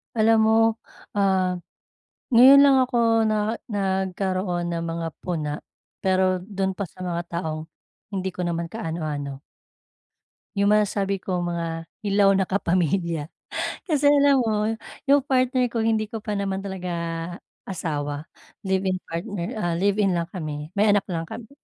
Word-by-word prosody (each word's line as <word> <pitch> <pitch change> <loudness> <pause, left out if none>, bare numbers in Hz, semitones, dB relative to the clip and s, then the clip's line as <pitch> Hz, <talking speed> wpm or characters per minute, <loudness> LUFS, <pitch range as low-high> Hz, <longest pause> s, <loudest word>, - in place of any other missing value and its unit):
Alam 225 0 +4
mo, 220 0 +4 0.6
ah, 190 -2 +2 0.8
ngayon 265 +4 +9
lang 280 -1 +7
ako 230 -3 +2
na 215 +1 0 0.2
nagkaroon 190 -2 -1
ng 165 - -2
mga 165 0 -3 0.2
puna 155 -5 -2 0.5
pero 185 -1 +3
dun 195 -1 -2
pa 200 - -3
sa 185 0 -11
mga 175 -2 -2
taong 160 -2 -3 0.5
hindi 190 -2 -2
ko 180 - -3
naman 170 -1 -2
kaano-ano. 155 -8 -4 1.2
Yung 200 - +3
masasabi 200 -2 +1
ko 180 -2 -1
mga 170 -1 -3 0.2
hilaw 200 -1 +4
na 190 - +3
kapamilya 170 -4 0 0.6
kasi 295 -2 +2
alam 285 -1 +5
mo 215 -3 +1 0.4
yung 285 - +7
partner 255 -1 +2
ko 230 -1 -2
hindi 220 -1 +1
ko 220 0 -7
pa 210 -1 -2
naman 195 -1 -2
talaga 190 -2 -5 0.8
asawa, 150 -5 -3 0.4
live-in 190 -1 +1
partner, 170 +2 -4
ah, 175 -5 0
live-in 195 +1 +2
lang 170 -1 -1
kami 155 -5 -5
may 210 - +5
anak 205 -1 +4
lang 165 -2 -2
kami 225 +3 -9
190 Hz, 140 wpm, -24 LUFS, 170-215 Hz, 1.2 s, ngayon